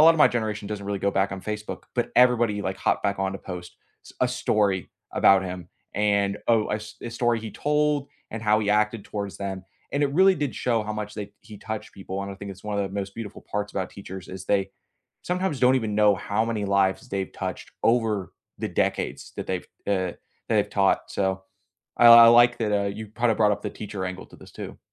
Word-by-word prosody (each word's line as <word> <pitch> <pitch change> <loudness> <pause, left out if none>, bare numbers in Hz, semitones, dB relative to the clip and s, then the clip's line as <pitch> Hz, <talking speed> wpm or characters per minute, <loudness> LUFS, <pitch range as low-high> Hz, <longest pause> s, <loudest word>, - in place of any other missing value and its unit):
lotta 165 +1 +8
my 150 - +7
generation 110 -3 -2
doesn't 100 -2 -5
really 100 -1 -2
go 100 - +2
back 95 +1 +1
on 95 - -5
Facebook, 105 +1 -5
but 120 - 0
everybody, 120 -4 +4
like, 95 0 -2
hopped - - 0
back 100 -1 0
on 95 0 0
to 95 - -5
post 90 -2 -8 0.3
s - - -13
a 125 - +3
story 105 -6 0 0.2
about 95 -1 +5
him, 90 -2 -6 0.3
and, 100 -1 +1
oh, 115 -2 +3
a - - +1
s 105 0 -9
a 120 - -5
story 120 -1 +1
he 110 0 -6
told 150 +2 0 0.2
and 115 0 -5
how 105 -1 +4
he 105 -1 0
acted 105 0 +1
towards 100 -4 -5
them. 95 -2 -4 0.3
And 145 - 0
it 140 -1 +1
really 190 +3 +6
did 145 -5 -2
show 115 -3 0
how 105 0 -4
much 105 0 -5
they 105 -1 -6
he 105 -2 -12
touched 110 -1 -6
people, 95 0 -5
and 100 - -5
I - - -8
think 100 0 -7
it's 95 +2 -16
one 105 -1 -2
of 100 - +1
the 95 - -10
most 100 -1 -4
beautiful 115 -3 -8
parts 105 0 -2
about 95 -1 -3
teachers, 95 -2 -9
is, 95 0 -7
they 95 -1 +1 0.5
sometimes 180 -5 -1
don't 125 +1 +5
even 110 -4 -1
know 105 -1 +5
how 105 +3 -1
many 110 -3 -2
lives 100 +4 +1
they've 95 -1 -3
touched - - -6
over 110 -6 +1 0.3
the - - -2
decades - - -2
that - - -5
they've 95 -1 -3 0.2
eh, 95 -3 +1
that - - -26 0.3
they've - - +2
taught. - - +3
So, 95 -1 -1 0.5
I 120 - +6
I 115 0 +11
like 120 +1 +6
that, 110 -2 0
uh, 100 -1 +1
you 110 +2 -6
b 105 - -22
kinda 120 -2 +3
brought 105 -2 +4
up - - -3
the - - -3
teacher 100 -3 -6
angle 90 0 -6
to - - -16
this, - - -15
too. - - -8
105 Hz, 230 wpm, -25 LUFS, 100-115 Hz, 0.5 s, I